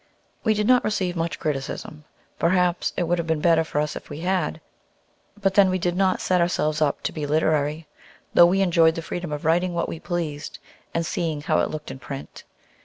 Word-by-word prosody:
We 220 -2 +2
did 210 0 0
not 250 +2 +5
receive 185 -4 -1
much 165 0 -2
criticism; 150 +1 -4 0.3
perhaps 180 0 +2
it 180 - +1
would 175 +1 0
have 165 - -3
been 160 -1 +1
better 165 0 +4
for 150 -2 -2
us 150 0 -1
if - - -9
we 145 +2 -7
had. 180 -3 -1 0.8
But 195 -2 +1
then 195 -1 +6
we 185 - +1
did 175 -1 -1
lot 190 0 +2
set 180 -1 +2
ourselves 155 -3 0
up 145 -2 +1
to - - -1
be 150 -2 -4
literary; 155 0 +1 0.5
though 175 - +8
we 190 +2 +2
enjoyed 165 -3 +4
the 165 - -4
freedom 175 -1 -5
of 150 0 -4
writing 175 +2 +2
what 170 - 0
we 165 - -6
pleased, 160 -4 -4 0.3
and 165 0 -1
seeing 160 -2 -2
how - - +1
it - - +1
looked 155 -1 -6
in 135 - -8
print. 135 +1 -8
165 Hz, 210 wpm, -24 LUFS, 155-180 Hz, 0.8 s, though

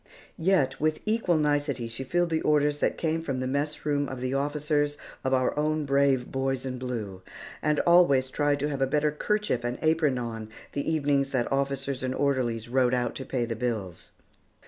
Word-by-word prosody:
Yet, 165 -7 +2
with 155 0 +1
equal 215 -6 +2
nicety, 145 -5 0
she 115 +3 -6
filled 175 +5 0
the 160 - +1
orders 150 -1 +2
that - - 0
came 160 0 0
from 135 -5 -3
the 130 - -2
mess 145 +4 -2
room 145 -2 0
of 130 - -6
the 130 +1 -2
officers 145 +1 0 0.3
of 130 - 0
our 130 -1 +2
own 155 0 0
brave 140 -2 +2
boys 135 0 -1
in 130 -1 -4
blue, 110 -7 -5 0.4
and 150 -1 +1
always 140 -7 +4
tried 145 0 +1
to 145 - 0
have 140 -2 -3
a 135 - +3
better 150 +2 +1
kerchief 210 - -1
and 120 +1 -2
apron 155 -4 +2
on 115 -2 -5 0.2
the 145 +3 -1
evenings 140 -3 +1
that 125 -2 0
officers 135 -1 -1
and 130 0 -2
orderly 130 -5 +1
rode 125 0 +2
out 120 -2 -1
to 130 - -6
pay 125 -2 -1
the 115 -1 -3
bills. 110 -7 -4
140 Hz, 190 wpm, -27 LUFS, 130-150 Hz, 0.4 s, always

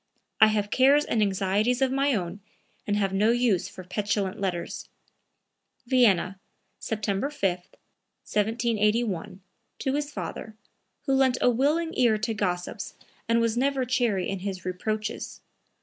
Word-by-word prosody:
I 220 - +8
have 210 -1 0
cares 280 +3 +5
and 225 - 0
anxieties 205 +4 +1
of 265 -1 +2
my 275 0 +2
own 180 0 -3 0.5
and 205 0 +1
have 195 -2 0
no 210 +3 +3
use 235 -6 +2
for 185 - -10
petulant 200 +2 -2
letters." 180 -3 -3 1.0
(Vienna, 210 -7 +3 0.4
September 210 +3 -2
5, 195 -11 0
1781, 210 0 -2 0.4
to 265 - -1
his 290 0 -2
father, 220 -5 -6 0.5
who 270 - +1
lent 265 -2 +3
a 250 - +4
willing 305 +7 +1
ear 235 -3 +3
to 220 +2 -2
gossips 180 -4 -3 0.3
and 230 0 +4
was 230 -1 +1
never 265 +1 +1
chary 230 -7 0
of 195 - -3
his 190 -1 -5
reproaches. 215 +4 -3
215 Hz, 135 wpm, -26 LUFS, 195-250 Hz, 1.0 s, I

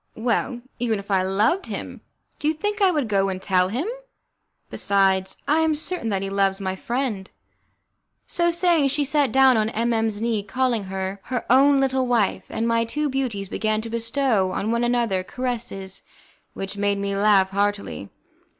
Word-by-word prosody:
"Well, 240 +2 -1 0.2
even 230 -3 0
if 200 +1 -8
I 190 -1 +3
loved 210 - +1
him, - - -6 0.4
do 295 - -1
you 315 - +2
think 415 +6 -3
I 390 - +6
would 300 -8 0
go 195 -2 +1
and 185 -1 -3
tell 185 -1 +2
him? 250 - -2 0.9
Besides, 190 -1 +1
I 300 +3 +3
am 320 -1 +2
certain 315 -5 -2
that 195 -2 -1
he 195 - -3
loves 195 0 +1
my 190 -1 -3
friend." 230 -3 -3 1.0
So 345 0 +1
saying, 340 -4 +3
she 290 +2 0
sat 285 -3 +1
down 265 -1 +5
on 215 0 +1
M 235 +1 0
M 225 0 +1
's 205 -1 -6
knee, 225 -2 0
calling 240 0 -1
her 190 +1 -4
her 250 -2 -3
own 275 +2 +5
little 265 -1 +1
wife, 235 -5 +1
and 230 - -2
my 230 0 +2
two 295 +6 -2
beauties 250 -7 -2
began 215 +2 -1
to 225 0 -7
bestow 230 -3 +1
on 215 - -1
one 235 +1 +1
another 235 -6 +1
caresses 230 -5 -5 0.5
which 195 +1 -5
made 200 0 +1
me 200 0 -2
laugh 200 -2 +4
heartily. 200 - -2
225 Hz, 180 wpm, -23 LUFS, 195-265 Hz, 1.0 s, I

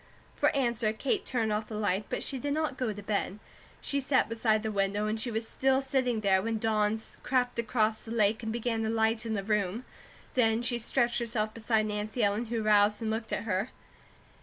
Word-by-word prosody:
For - - +3
answer 235 -5 +1
Kate 255 +4 -1
turned 225 -4 0
off 215 +1 -2
the 220 - -6
light; 205 -1 0
but - - -2
she 270 - -3
did 285 +3 -1
not 310 -3 -1
go 250 -4 -1
to 205 0 -8
bed. 200 -1 -1 0.4
She 280 - 0
sat 265 -1 +2
beside 225 -1 +1
the 220 - -1
window 200 +1 0
and 215 +1 -1
she 240 - 0
was 225 0 -2
still 265 0 +2
sitting 260 -4 0
there 190 -2 +3
when 225 +2 -1
dawn 215 -1 +1 0.2
crept 250 -2 0
across 220 -1 +1
the - - -12
lake 220 -1 +2
and 220 -1 -3
began 230 0 -1
to 220 - -1
lighten 225 0 +1
the 200 - -2
room. 210 +2 -1 0.5
Then 225 -2 +2
she 240 -1 0
stretched 240 +1 +1
herself 220 -2 -1
beside 220 -1 +1
Nancy 215 +2 -2
Ellen, 205 +3 +1
who 230 -1 -2
roused 210 0 +4
and 220 - 0
looked 220 0 -3
at - - -1
her. 210 +1 -1
220 Hz, 210 wpm, -30 LUFS, 215-240 Hz, 0.5 s, roused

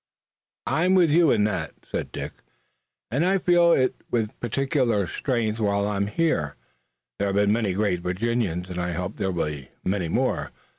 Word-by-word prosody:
"I'm 175 +7 +2
with 175 -5 +5
you 165 0 +5
in 105 - +3
that," 95 -6 -2
said - - -4
Dick, - - -5 0.8
"and 135 +7 +1
I 190 +2 +3
feel 175 -1 +4
it 130 -1 +1
with 115 -3 -1
particular 125 - +1
strength 115 - -1
while 100 -1 +1
I 105 - -1
am 100 0 0
here. 105 - 0 0.6
There 100 - +1
have 100 - -1
been 100 0 +3
many 110 -4 0
great 100 -2 0
Virginians 90 -1 -1
and 90 -1 -5
I 90 0 -2
hope 90 +4 -4
there'll 95 -3 -1
be 75 -5 -3 0.2
many 95 -2 0
more." - - 0
105 Hz, 175 wpm, -25 LUFS, 90-135 Hz, 0.8 s, with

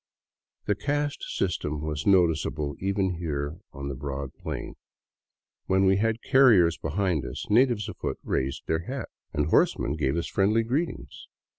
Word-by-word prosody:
The 105 - +2
caste 145 +7 -2 0.2
system 75 -5 -1
was 75 +1 -3
noticeable 80 -6 +2
even 95 -2 0
here 75 -1 -3
on 70 -1 -6
the 70 - -3
broad 70 0 -5
plain. - - -6 0.9
When 95 +1 +3
we 95 0 +4
had 115 +2 0
carriers 115 - +5
behind 85 -1 -1
us, - - -5
natives 120 -2 +3
afoot - - -4
raised 65 +1 -2
their 80 +2 -1
hats 130 0 -5 0.2
and 75 - 0
horsemen 70 - +2
gave 75 0 0
us 85 - -1
friendly 105 +3 +2
greetings. 120 - -3
90 Hz, 145 wpm, -27 LUFS, 75-105 Hz, 0.9 s, carriers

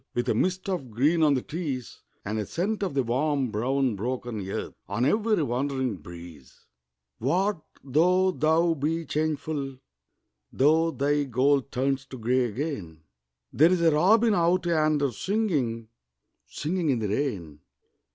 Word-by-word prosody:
With 120 - -1
a - - +3
mist 185 +1 -1
of 175 -10 -3
green 145 +9 +2
on 150 -3 +4
the 130 - -2
trees 145 -7 -5 0.2
And 110 +2 -2
a 105 - -2
scent 205 +6 -2
of 185 -7 -2
the 135 - +2
warm 135 +1 0
brown 125 +2 0
broken 115 -2 -4
earth - - -4 0.2
On 120 - 0
every 210 +2 +2
wandering 130 -3 -1
breeze; 85 -5 -13 0.5
What, 180 - 0 0.2
though 180 +7 +3
thou 165 +1 +2
be 160 +3 -2
changeful, 150 -3 -2 0.7
Though 160 +4 +3
thy 145 -1 0
gold 135 +2 +1
turns 135 +1 -1
to 130 - -9
grey 125 +2 +1
again, 105 - -5 0.5
There's 170 +4 +4
a 165 -1 +5
robin 210 +9 +4
out 175 0 +2
yonder 155 -4 +2
singing, 140 - -1 0.6
Singing 165 +1 -2
in 130 - +2
the 110 -2 -2
rain. 95 - -3
140 Hz, 140 wpm, -26 LUFS, 125-165 Hz, 0.7 s, a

